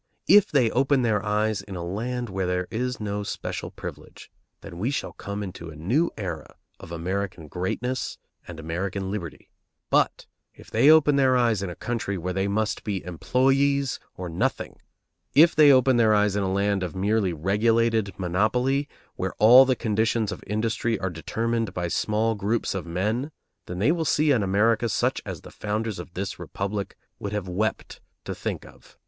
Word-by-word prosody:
If 205 -1 +7
they 125 -6 +3
open 135 0 +2
their 105 -3 +1
eyes 105 0 0
in 100 - -9
a 85 -1 -4
land 120 +7 -3
where 95 -2 -2
there 90 0 -1
is 125 +2 -2
no 105 -1 -3
special 100 - -5
privilege, - - -10 0.3
then 85 - -9
we 115 +7 0
shall 140 - -3
come 100 +1 -5
into 85 -3 -7
a 80 - -10
new 120 - +1
era 90 -7 -6 0.2
of - - -11
American 90 0 -3
greatness 115 - -3 0.3
and 85 -2 -8
American 95 +4 -3
liberty; 90 -6 -6 0.4
but - - +2 0.3
if - - -16
they 120 +6 +5
open 155 -2 +6
their 130 -2 +4
eyes 115 -5 +2
in 100 - -3
a 90 - -7
country 115 -5 -3
where 90 +1 -3
they 95 +1 0
must 105 +1 -1
be 100 -3 -3
employees 135 - +1 0.2
or 90 - -6
nothing, 85 0 -2 0.6
if 160 +4 +7
they 150 -2 +7
open 130 -1 +5
their 110 -2 +4
eyes 105 -1 +2
in 105 - +1
a 95 -1 -1
land 100 0 +1
of 90 -2 -4
merely 100 0 +1
regulated 110 +5 +1
monopoly, 125 - +1 0.3
where 95 0 -3
all 125 +5 +8
the 130 -1 +2
conditions 110 -1 0
of - - -7
industry 115 +2 -1
are 95 -1 -3
determined 115 +6 -2
by 90 -1 -1
small 105 +5 0
groups 105 +2 -1
of 95 -3 -4
men, 105 - -1 0.4
then 90 - -5
they 105 - +3
will 165 -1 0
see 150 0 +2
an 125 -6 +3
America 105 +4 +2
such - - 0
as - - -6
the - - -12
founders 105 -1 -3
of 85 0 -9
this 95 0 -4
Republic 100 0 -4 0.2
would 100 0 -5
have 105 -3 -3
wept 100 +5 -3 0.2
to - - -3
think - - -4
of. - - -18
105 Hz, 180 wpm, -25 LUFS, 95-120 Hz, 0.6 s, all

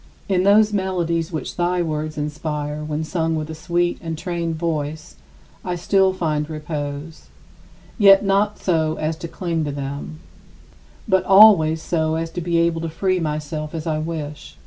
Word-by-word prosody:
In 190 -3 +2
those 210 +2 +4
melodies 175 -4 -1
which 160 - -5
thy 175 0 +1
words 155 -1 -3
inspire 150 0 -3
when 150 +1 -3
sung 165 0 -1
with 155 0 -4
a - - -5
sweet 175 +2 -1
and 165 -1 -4
trained 170 -1 -3
voice, 155 - -3 0.5
I 180 -1 -2
still 190 +2 +3
find 155 -4 -2
repose; 150 0 -6 0.7
yet 195 -1 +7
not 200 +2 +2
so 160 -3 0
as 155 +1 -2
to 170 - -6
cling 165 -2 -2
to 145 - -2
them, 140 - -6 0.9
but 190 0 +3
always 190 -6 +6
so 160 -2 0
as 165 0 -3
to 175 - -4
be 170 0 0
able 165 -1 +1
to 165 - -3
free 185 +3 0
myself 155 0 -4
as 160 - -4
I 155 -2 -1
wish. 150 - -6
165 Hz, 165 wpm, -21 LUFS, 155-175 Hz, 0.9 s, yet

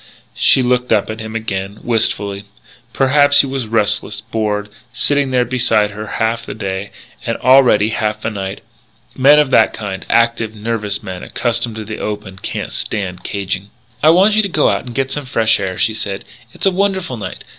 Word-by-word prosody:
She 130 - +4
looked 125 0 0
up 110 -1 +2
at 110 - -7
him 110 0 -7
again, 100 -2 -3
wistfully. 100 -4 +1 0.5
Perhaps 145 +2 +4
he - - -3
was 135 -3 -3
restless, 105 -1 +1
bored, 105 -1 -3 0.2
sitting 140 +2 +1
there 125 -1 +2
beside 120 -4 +2
her 105 +1 -7
half 115 +1 0
the - - -7
day, 100 -1 -4 0.3
and, - - -2
already, 125 -5 +5
half 110 -1 -2
the 110 - -2
night. 95 -1 -5 0.5
Men 140 +3 +6
of 150 -3 +3
that - - +4
kind 100 -3 -5
active, 115 -1 +1
nervous 105 -1 -2
young - - -13
men 95 -2 -6
accustomed 120 -1 -2
to 110 -1 -6
the 110 +1 -6
open, 105 -2 -5
can't - - -4
stand 95 -4 -3
caging. 100 0 -3 0.3
"I 155 - +5
want 190 +6 +5
you 215 - +5
to 200 - -2
go 155 -4 +2
out - - -1
and 120 -2 -9
get 135 0 -1
some 145 0 -3
fresh 115 -5 +2
air," 95 -2 -3
she 110 0 +1
said. 100 -2 -4 0.3
"It's - - -5
a 195 - +4
wonderful 190 -7 -1
night. 105 - -7
110 Hz, 190 wpm, -17 LUFS, 105-130 Hz, 0.5 s, Men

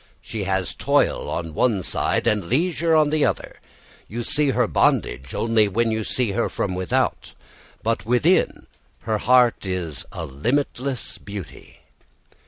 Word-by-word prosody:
She 105 -3 -5
has 95 -1 -1
toil - - +1
on 80 -2 -4
one 105 +1 +1
side - - 0
and 105 -4 +1
leisure 165 - +1
on 155 -1 +4
the 155 -1 +2
other. - - -2 0.5
You 120 +3 -4
see 145 +2 +1
her 130 - +2
bondage 65 +2 +1
only 115 -2 +3
when 115 +3 +1
you 110 0 -1
see 120 0 0
her 115 +4 0
from 95 - -2
without, 90 0 -1 0.5
but 115 +1 0
within 125 - +2 0.4
her 110 -1 -1
heart 125 -1 +4
is 90 -7 -3
a - - -5
limitless 130 - -2
beauty. 100 -2 -10
115 Hz, 145 wpm, -23 LUFS, 95-130 Hz, 0.5 s, on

